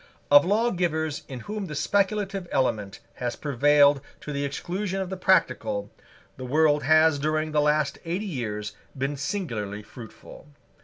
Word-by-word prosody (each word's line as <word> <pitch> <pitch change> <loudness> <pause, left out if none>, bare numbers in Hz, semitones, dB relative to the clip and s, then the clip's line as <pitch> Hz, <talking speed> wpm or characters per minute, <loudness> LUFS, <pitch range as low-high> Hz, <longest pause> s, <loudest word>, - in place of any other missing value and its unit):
Of 145 0 +9
lawgivers 175 -8 0
in 130 -3 -7
whom 210 - -5
the 150 - -6
speculative 195 +2 0
element 105 -7 -1 0.2
has 120 -1 -3
prevailed 145 0 +4 0.2
to 150 - -6
the 140 0 -2
exclusion 185 +7 -3
of 190 -1 -4
the - - -2
practical, 130 - +1 0.5
the 130 - -7
world 150 +2 +3
has 155 +1 +4
during 155 +1 -1
the 150 -1 +2
last 150 -1 +1
eighty 180 +5 -3
years 105 - -4 0.2
been 135 +2 -1
singularly 115 - -4
fruitful. 120 +5 -13
150 Hz, 145 wpm, -26 LUFS, 130-180 Hz, 0.5 s, Of